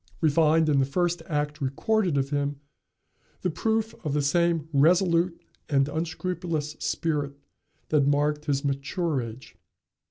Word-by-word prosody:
We 160 -2 +3
find, 160 +1 +4
in 145 -2 +3
the 135 - +3
first 175 +4 0
act 150 0 -2
recorded 175 +5 +1
of 135 +1 -1
him, 145 0 0 0.9
the 180 - 0
proof 220 +5 0
of 150 -4 -2
the 150 - +2
same 165 +1 +2
resolute 170 +3 +3 0.3
and 135 -2 +3
unscrupulous 160 0 -3
spirit 145 -4 -1 0.6
that 145 -3 +3
marked 150 +1 +1
his 140 -1 0
mature 140 +2 -1
age. 115 +2 -9
150 Hz, 135 wpm, -26 LUFS, 140-170 Hz, 0.9 s, find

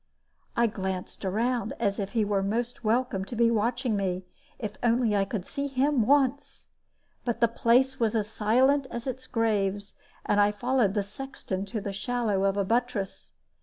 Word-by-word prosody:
I 235 - +5
glanced 190 -4 -4
around, 225 +3 0
as 200 -3 0
if 200 -1 -3
he 225 -3 +2
were 200 -1 +1
most 235 +5 -2
welcome 225 -3 +1
to 240 - -6
be 230 0 +4
watching 235 +2 0
me, 185 -2 -2 0.3
if 215 -4 -4
only 235 -2 +2
I 195 -1 +2
could 195 -2 -4
see 280 0 -3
him 270 -3 +1
once. 280 -1 +1 0.5
But 240 -2 -2
the 235 - +5
place 250 +4 +2
was 230 -1 +1
as 210 -2 +1
silent 260 +6 +2
as 235 0 -5
its 260 0 -5
graves; 205 -3 -1 0.3
and 205 - +2
I 205 0 +4
followed 235 -1 +1
the 205 - +1
sexton 200 -3 -5
to 215 +2 -4
the 200 -1 -4
shadow 210 -2 0
of 195 0 +1
a 200 - +1
buttress. 230 -2 -2
225 Hz, 175 wpm, -27 LUFS, 200-245 Hz, 0.5 s, I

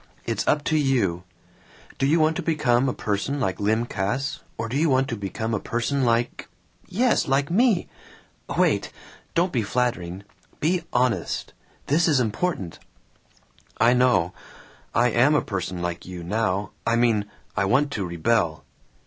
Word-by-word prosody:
It's - - -2
up 150 -1 +2
to 155 - +1
you. 100 - +1 0.7
Do 135 - +2
you 160 +4 +3
want 155 +1 +3
to - - -1
become 135 -5 +2
a - - +1
person 105 +8 -2
like 95 -8 -1
Lym 110 +3 +1
Cass, 120 +7 -2 0.2
or 115 - -3
do 120 - -4
you 155 +3 +2
want 130 0 +3
to 115 - -2
become 110 +2 -4
a 105 - +1
person 125 +6 -1
like 120 0 0 0.4
yes, 240 +6 +2
like 140 +3 +1
me! 220 -1 +3 0.7
Wait! - - +2 0.4
Don't 175 +2 +2
be 120 - +2
flattering. 100 -5 -2 0.4
Be 170 +3 +1
honest. 125 -1 0 0.3
This 160 +5 +3
is 150 -5 +4
important." 110 - -2 1.0
"I 115 +2 +5
know. 100 -8 +3 0.6
I 120 +1 +4
am 130 +7 +4
a - - +4
person 90 -3 -4
like 85 -1 -3
you 90 -2 -7
now! 100 0 -1
I 115 - +1
mean, 115 -4 +2 0.3
I 100 - +1
want 140 +8 +2
to 105 - -2
rebel." 85 -1 0
120 Hz, 155 wpm, -24 LUFS, 100-140 Hz, 1.0 s, I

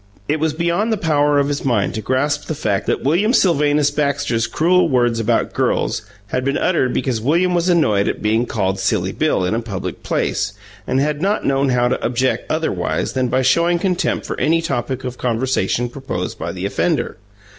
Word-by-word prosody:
It 155 +2 0
was 160 0 0
beyond 170 +7 0
the 220 - +1
power 150 -4 +2
of 140 0 +2
his 145 0 -2
mind 115 -7 +1
to 110 - -3
grasp 145 +6 0
the 155 - -2
fact 105 -9 -1
that - - 0
William 180 - +2
Sylvanus 150 - +3
Baxter's 140 -6 0
cruel 170 +8 +2
words 120 -3 +2
about 115 +1 0
"girls" - - 0 0.3
had 130 - -1
been 140 +1 0
uttered 145 -8 +1
because 125 -4 -1
William 170 +8 +2
was 175 +1 +1
annoyed 110 - +3
at - - -2
being 110 +3 +1
called 95 -3 -1
"Silly - - 0
Bill" 90 - 0
in 90 - 0
a 115 - 0
public 105 -5 -5
place, 100 - -1 0.3
and 130 - +1
had 150 +1 0
not 200 +3 0
known 135 0 +2
how 125 -1 +2
to 125 - -1
object 130 +2 0
otherwise - - -1
than 130 -1 0
by 130 +2 +1
showing 170 +7 +3
contempt 180 0 -1
for - - -4
any 165 +2 +2
topic 130 -4 -3
of 125 -1 -6
conversation 120 -1 0
proposed 120 -8 -5
by - - -3
the - - -5
offender. - - -1
135 Hz, 195 wpm, -19 LUFS, 120-155 Hz, 0.3 s, Sylvanus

